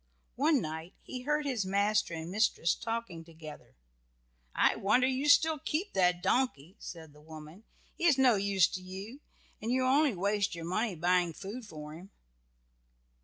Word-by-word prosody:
One 290 Hz, 0 st, +3 dB
night 160 Hz, +3 st, -6 dB
he 255 Hz, -, -7 dB
heard 300 Hz, +3 st, 0 dB
his 250 Hz, -7 st, -1 dB
master 200 Hz, -1 st, +1 dB
and 165 Hz, +2 st, -6 dB
mistress 205 Hz, -5 st, +2 dB
talking 225 Hz, -8 st, -5 dB
together. 160 Hz, -2 st, -12 dB, 0.8 s
"I -, -, +3 dB
wonder 245 Hz, +6 st, +2 dB
you 265 Hz, +3 st, 0 dB
still 315 Hz, +1 st, +5 dB
keep 340 Hz, +9 st, -3 dB
that 180 Hz, -1 st, +2 dB
donkey," 190 Hz, -, 0 dB
said 160 Hz, -4 st, -9 dB
the 150 Hz, -, -18 dB
woman; 155 Hz, +6 st, -12 dB, 0.3 s
"he -, -, -3 dB
is 290 Hz, -5 st, +5 dB
of 265 Hz, -, +3 dB
no 250 Hz, -2 st, +6 dB
use 195 Hz, -3 st, +3 dB
to 185 Hz, -, -6 dB
you, 195 Hz, +8 st, -8 dB, 0.4 s
and 225 Hz, +2 st, -2 dB
you 255 Hz, 0 st, +1 dB
only 275 Hz, -1 st, +3 dB
waste 200 Hz, +1 st, 0 dB
your 165 Hz, -1 st, -7 dB
money 200 Hz, +3 st, -1 dB
buying 175 Hz, 0 st, +1 dB
food 210 Hz, +7 st, -8 dB
for 150 Hz, -4 st, -9 dB
him." 175 Hz, +5 st, -11 dB
200 Hz, 170 wpm, -31 LUFS, 170-255 Hz, 0.8 s, no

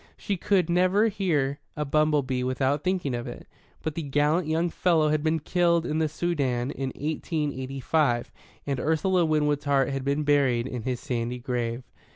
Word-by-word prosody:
She 200 Hz, -, -2 dB
could 185 Hz, -1 st, +1 dB
never 185 Hz, +5 st, +3 dB
hear 155 Hz, -9 st, 0 dB, 0.2 s
a 150 Hz, -, -1 dB
bumble 150 Hz, 0 st, +2 dB
bee 130 Hz, -1 st, -2 dB
without 135 Hz, +3 st, 0 dB
thinking 180 Hz, -7 st, 0 dB
of 120 Hz, 0 st, -3 dB
it. -, -, -8 dB, 0.4 s
But 160 Hz, -, -2 dB
the 165 Hz, -, -3 dB
gallant 150 Hz, +3 st, +1 dB
young 165 Hz, +2 st, 0 dB
fellow 160 Hz, -4 st, +2 dB
had 150 Hz, 0 st, +1 dB
been 160 Hz, +1 st, +1 dB
killed 170 Hz, +1 st, +2 dB
in 155 Hz, -, -1 dB
the 160 Hz, -1 st, +1 dB
Soudan 140 Hz, -6 st, -1 dB
in 135 Hz, -1 st, -4 dB
eighteen 150 Hz, 0 st, -2 dB
eighty 130 Hz, +1 st, -5 dB
five, 130 Hz, -4 st, +1 dB, 0.3 s
and 140 Hz, -2 st, -2 dB
Ursula 170 Hz, +4 st, +2 dB
Winwood's 150 Hz, -2 st, +1 dB
heart 140 Hz, -2 st, +2 dB
had 135 Hz, -1 st, -3 dB
been 140 Hz, +2 st, 0 dB
buried 135 Hz, -5 st, +2 dB
in 125 Hz, -2 st, -4 dB
his 125 Hz, +1 st, -2 dB
sandy 125 Hz, -3 st, -3 dB
grave. 120 Hz, 0 st, -3 dB
150 Hz, 185 wpm, -26 LUFS, 130-160 Hz, 0.4 s, never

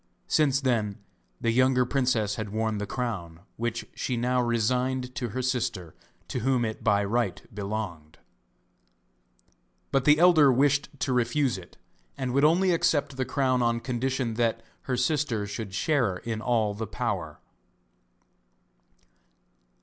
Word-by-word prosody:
Since 140 Hz, -3 st, +2 dB
then 110 Hz, -6 st, 0 dB, 0.4 s
the 115 Hz, -, +1 dB
younger 130 Hz, +1 st, +3 dB
princess 125 Hz, -6 st, +1 dB
had 110 Hz, 0 st, -4 dB
worn 110 Hz, 0 st, -1 dB
the 105 Hz, -, -3 dB
crown, 95 Hz, -11 st, -4 dB
which 115 Hz, 0 st, -3 dB
she 125 Hz, -, -2 dB
now 125 Hz, +1 st, +1 dB
resigned 125 Hz, +2 st, 0 dB
to 125 Hz, -4 st, -3 dB
her 130 Hz, +5 st, -3 dB
sister 115 Hz, -9 st, -2 dB, 0.3 s
to -, -, -3 dB
whom 125 Hz, 0 st, +1 dB
it 110 Hz, -1 st, -5 dB
by 100 Hz, -2 st, +3 dB
right 115 Hz, -1 st, 0 dB
belonged. 100 Hz, -7 st, -5 dB, 1.7 s
But 135 Hz, -2 st, +1 dB
the 150 Hz, 0 st, +6 dB
elder 160 Hz, -5 st, +6 dB
wished 140 Hz, +2 st, +2 dB
to 130 Hz, -, 0 dB
refuse 125 Hz, +2 st, +1 dB
it, 90 Hz, -2 st, -11 dB, 0.4 s
and 130 Hz, -2 st, -2 dB
would 140 Hz, +2 st, +3 dB
only 180 Hz, +5 st, +4 dB
accept 165 Hz, -5 st, +1 dB
the 130 Hz, 0 st, -1 dB
crown 130 Hz, -2 st, +1 dB
on 115 Hz, -1 st, +1 dB
condition 130 Hz, 0 st, -2 dB
that 115 Hz, -1 st, 0 dB, 0.2 s
her 130 Hz, -2 st, -1 dB
sister 125 Hz, -5 st, 0 dB
should 100 Hz, -1 st, -6 dB
share 125 Hz, -6 st, +1 dB
in 110 Hz, +3 st, -4 dB
all 110 Hz, -4 st, +1 dB
the 110 Hz, +2 st, -5 dB
power. 100 Hz, -9 st, -3 dB
120 Hz, 140 wpm, -27 LUFS, 110-130 Hz, 1.7 s, the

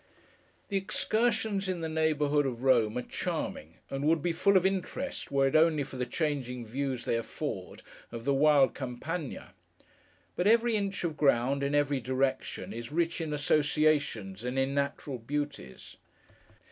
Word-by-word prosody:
The 200 Hz, -, +1 dB
excursions 215 Hz, 0 st, 0 dB
in 180 Hz, -2 st, -2 dB
the 160 Hz, -, -2 dB
neighbourhood 150 Hz, -2 st, +1 dB
of 125 Hz, -1 st, -5 dB
Rome 120 Hz, -4 st, +3 dB
are 125 Hz, -, -2 dB
charming, 80 Hz, -7 st, -4 dB, 0.2 s
and 135 Hz, +1 st, -3 dB
would 160 Hz, -1 st, +2 dB
be 175 Hz, -, +1 dB
full 200 Hz, +4 st, +4 dB
of 185 Hz, -, +2 dB
interest 195 Hz, +8 st, -2 dB
were 135 Hz, -1 st, +3 dB
it 135 Hz, -, +1 dB
only 155 Hz, -2 st, +4 dB
for 135 Hz, -1 st, -9 dB
the 125 Hz, 0 st, -2 dB
changing 130 Hz, -6 st, -2 dB
views 130 Hz, +2 st, -3 dB
they -, -, +1 dB
afford, 115 Hz, -, -5 dB, 0.3 s
of 115 Hz, 0 st, -7 dB
the 140 Hz, -, +2 dB
wild 145 Hz, -1 st, +5 dB
Campagna. 140 Hz, +4 st, -5 dB, 0.8 s
But, 180 Hz, -, +1 dB
every 230 Hz, +1 st, +4 dB
inch 200 Hz, -2 st, -2 dB
of 165 Hz, -3 st, -1 dB
ground, 140 Hz, -1 st, +2 dB
in 140 Hz, +1 st, 0 dB
every 145 Hz, -1 st, +2 dB
direction, 130 Hz, +1 st, -2 dB
is 120 Hz, +3 st, -7 dB
rich 170 Hz, +2 st, 0 dB
in 160 Hz, -2 st, -3 dB
associations, 145 Hz, -8 st, +1 dB
and 125 Hz, +2 st, -3 dB
in 135 Hz, +1 st, +1 dB
natural 140 Hz, -2 st, -2 dB
beauties. 140 Hz, -, -5 dB
145 Hz, 160 wpm, -30 LUFS, 130-165 Hz, 0.8 s, wild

